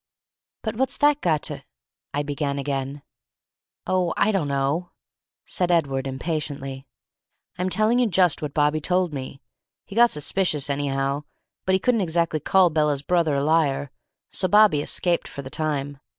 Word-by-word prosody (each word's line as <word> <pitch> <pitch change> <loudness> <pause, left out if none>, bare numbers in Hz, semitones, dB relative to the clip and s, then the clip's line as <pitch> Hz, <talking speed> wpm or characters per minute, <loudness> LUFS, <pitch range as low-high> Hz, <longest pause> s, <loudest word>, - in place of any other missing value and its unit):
"But 220 -1 -3
what's 265 +1 0
that 290 0 +3
got 160 -4 +1
to - - -6 0.3
" - - -59
I 145 - 0
began 145 -1 -2
again. 140 0 -3 0.8
"Oh, 180 -2 0
I 215 - +3
dunno," 145 -1 -1 0.5
said 180 -1 -1
Edward, 140 -6 +1
impatiently. 135 -1 -4 0.7
"I'm 185 +1 0
telling 215 +6 +2
you 245 - +3
just 180 -5 +2
what 150 -2 -5
Bobby 150 +1 +2
told 180 0 +1
me. 135 0 -6 0.4
He 195 - -11
got 240 +1 +6
suspicious, 150 -3 0
anyhow, 140 0 -1 0.4
but 190 - +3
he - - +2
couldn't 230 +2 +2
exactly 170 -2 0
call 185 +3 +4
Bella's 150 -2 +1
brother 170 -3 +1
a 140 - 0
liar, 145 -3 +1 0.4
so 185 - +1
Bobby 205 -7 +5
escaped 175 +3 0
for 140 - -7
the 130 - -9
time. 145 -3 -2
155 Hz, 155 wpm, -24 LUFS, 140-180 Hz, 0.8 s, got